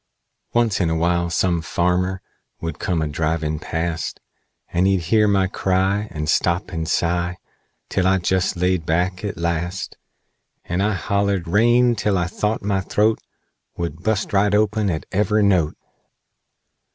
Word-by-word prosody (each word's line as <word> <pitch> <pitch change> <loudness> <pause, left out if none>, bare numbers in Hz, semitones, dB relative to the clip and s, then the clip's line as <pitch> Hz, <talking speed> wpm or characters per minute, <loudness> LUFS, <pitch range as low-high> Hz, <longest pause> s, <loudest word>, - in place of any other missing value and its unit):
"Once 120 -4 +2
in 85 - +2
awhile 85 +1 +1
some 85 0 +1
farmer 90 +3 0 0.4
Would 80 -2 -5
come 85 -4 0
a - - -1
drivin' 75 0 -1
past; 85 0 -3 0.5
And 90 +2 +3
he'd 95 -2 +2
hear 105 +6 +3
my 100 -2 +3
cry, 95 +2 0
And 75 -3 -4
stop 85 +4 +1
and 80 -2 -3
sigh 85 +1 0 0.5
Till 95 -1 0
I 95 0 +4
jest 95 +1 0
laid 90 -1 +1
back, 90 +4 0
at 100 -4 -4
last, 85 +2 -3 0.7
And 90 +2 -1
I 105 +1 +2
hollered 100 -1 0
rain 120 +6 +4
till 100 -1 0
I 90 - +1
thought 105 +5 -2
my 100 -1 0
th'oat 105 +3 +1 0.6
Would 85 -1 -4
bust 105 +2 -1
right 105 +1 +3
open 105 0 +2
at 80 -3 -3
ever' 105 +2 +2
note! 90 -6 +2
90 Hz, 150 wpm, -21 LUFS, 85-100 Hz, 0.7 s, I